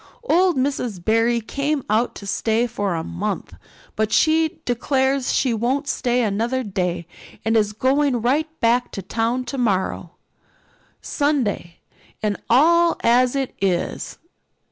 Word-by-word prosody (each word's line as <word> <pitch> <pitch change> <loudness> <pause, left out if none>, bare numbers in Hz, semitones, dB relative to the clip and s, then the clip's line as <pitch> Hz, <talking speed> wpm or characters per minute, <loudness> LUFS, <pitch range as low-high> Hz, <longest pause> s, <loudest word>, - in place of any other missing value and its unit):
Old 365 - +3
Miss 255 -6 -1
Barry 225 +5 +2
came 280 +5 -2
out 220 +3 +1
to 200 - -9
stay 220 +3 0
for 205 -6 -2
a 160 - -3
month, 85 0 -4 0.4
but 215 0 0
she 320 +1 +2
declares 265 +2 0
she 255 -3 +1
won't 255 +6 -1
stay 245 -3 0
another 230 +5 -1
day 180 -5 -2 0.4
and 225 +1 +2
is 210 -2 +2
going 260 +3 +1
right 280 +7 +1
back 240 +2 +2
to 195 - -5
town 235 +3 -1
tomorrow, 195 -9 -2 0.9
Sunday 260 - -1 0.4
and 210 -1 +1
all 335 +7 +4
as 245 +2 +3
it 270 -2 -2
is. 180 -3 -1
240 Hz, 130 wpm, -21 LUFS, 210-275 Hz, 0.9 s, all